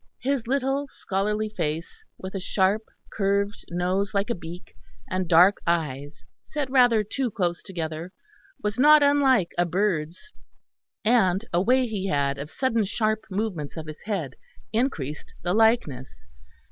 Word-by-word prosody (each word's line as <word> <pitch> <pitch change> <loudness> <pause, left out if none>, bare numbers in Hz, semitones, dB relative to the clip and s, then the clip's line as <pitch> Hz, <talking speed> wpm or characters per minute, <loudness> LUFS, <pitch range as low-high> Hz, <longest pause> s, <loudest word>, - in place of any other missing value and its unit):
His 265 -3 0
little 270 +2 0
scholarly 210 -1 -2
face, 165 - -4
with 190 0 -8
a 195 - -3
sharp 195 +3 +1 0.3
curved 200 0 0
nose 185 +4 -1
like 200 +4 +1
a - - +2
beak, 170 - -10 0.3
and 185 -2 -2
dark 180 +4 +6
eyes 145 -4 -2 0.2
set 295 -3 -4
rather 245 -5 +5
too 250 +5 -2
close 175 -4 -1
together, 165 -2 -5 0.5
was 210 +3 -2
not 300 +2 +7
unlike 270 -9 +3
a 175 - +4
bird's; 180 - -1 0.7
and 215 -3 +3
a 175 - +3
way 255 +5 +3
he 205 -4 -3
had 140 -5 0
of 145 +2 -6
sudden 230 +2 0
sharp 215 +1 -1
movements 190 -7 -3
of 160 - -5
his 155 -1 -9
head 180 -11 -2 0.4
increased 165 - -2
the 175 - 0
likeness. 155 - +1
200 Hz, 145 wpm, -25 LUFS, 170-230 Hz, 0.7 s, not